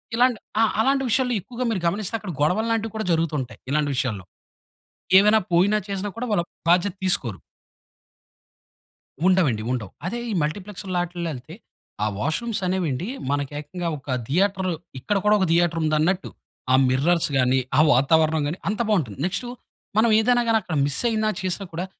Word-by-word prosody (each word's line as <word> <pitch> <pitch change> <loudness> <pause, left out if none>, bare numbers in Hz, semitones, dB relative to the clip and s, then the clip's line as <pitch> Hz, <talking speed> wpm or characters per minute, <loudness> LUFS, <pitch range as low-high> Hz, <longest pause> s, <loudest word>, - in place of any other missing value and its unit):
ఇలాంటి 245 -1 +3 0.2
ఆ! - - +6 0.2
అలాంటి 270 +4 +2
విషయాల్లో 250 +2 +2
ఎక్కువగా 245 +6 -5
మీరు 195 -5 -2
గమనిస్తే, 200 +4 -1
అక్కడ 200 -4 -6
గొడవల్లాంటివి 220 +7 0
కూడా 220 -1 -2
జరుగుతూ 165 -1 +1
ఉంటాయి. 125 - -9
ఇలాంటి 150 -1 +1
విషయాల్లో. 120 -8 -2 0.9
ఏమైనా 210 +3 +6
పోయినా, 195 +5 +4
చేసినా 200 +1 -3
కూడా 245 - -3
వాళ్ళ 205 - +2 0.3
బాధ్యత 175 +2 +3
తీసుకోరు. 120 - +1 1.9
ఉండవండి, 160 - +2
ఉండవు. 115 -7 -3
అదే 235 +7 -3
ఈ - - -1
మల్టీప్లెక్స్ 190 +6 -5
లాట్లో 175 -1 -2
ఎళ్తే, 135 +5 -10 0.5
ఆ - - +2
వాష్‌రూమ్స్ 180 - -2
అనేవండి 180 -4 -1 0.2
మనకు 145 -1 -1
ఏకంగా 175 +3 -5
ఒక 140 - -18 0.2
థియేటర్ 190 +4 +1 0.3
ఇక్కడ 205 +9 -1
కూడా 210 0 +5
ఒక 190 - +2
థియేటర్ 170 0 +2
ఉందన్నట్టు 155 +5 +1 0.4
ఆ - - +7
మిర్రర్స్ 155 +7 +2
గాని, 130 +1 +3 0.2
ఆ - - +6
వాతావరణం 155 +4 +3
గాని 165 - -3
అంత 210 +1 -1
బావుంటుంది. 150 - 0
నెక్స్టు 215 +7 -3 0.5
మనం 225 +1 +5
ఏదైనా 245 +2 +3
గానీ 225 - +4
అక్కడ 175 - -5
మిస్ 145 0 0
అయినా, 215 -1 0
చేసినా 190 +1 -2
కూడా 175 +3 -3
180 Hz, 155 wpm, -23 LUFS, 150-210 Hz, 1.9 s, ఆ